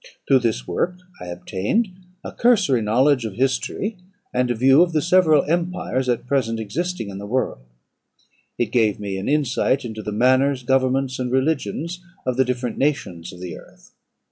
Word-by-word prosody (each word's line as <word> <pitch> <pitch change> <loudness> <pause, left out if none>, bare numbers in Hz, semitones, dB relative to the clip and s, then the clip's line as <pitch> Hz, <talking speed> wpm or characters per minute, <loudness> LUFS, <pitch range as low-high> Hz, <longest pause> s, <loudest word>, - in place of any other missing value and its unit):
Through 135 - +5
this 110 - -1
work 180 +1 -1 0.3
I 90 - -7
obtained 100 - -1 0.3
a - - -6
cursory 200 - +3
knowledge 125 +5 +3
of 110 -4 -5
history, 135 - -1 0.4
and 125 0 +1
a 120 - +1
view 135 +6 +5
of 175 -1 +2
the 155 - +2
several 170 -4 +4
empires 170 -6 -1
at 120 -1 0
present 125 -4 0
existing 115 - -3
in 95 - -7
the 100 - -7
world; 125 - -1 1.0
it 115 -3 -1
gave 110 -5 +2
me 100 -2 -4
an 95 - -3
insight 140 -2 +1
into 110 -2 -6
the 105 - -5
manners, 130 +4 +2
governments, 130 +1 +1
and 125 -1 -2
religions 160 +5 -1 0.2
of 130 -1 0
the 130 - +4
different 125 -1 -3
nations 100 - -1
of 90 -1 -12
the 90 -3 -6
earth. - - -16
130 Hz, 170 wpm, -22 LUFS, 110-150 Hz, 1.0 s, Through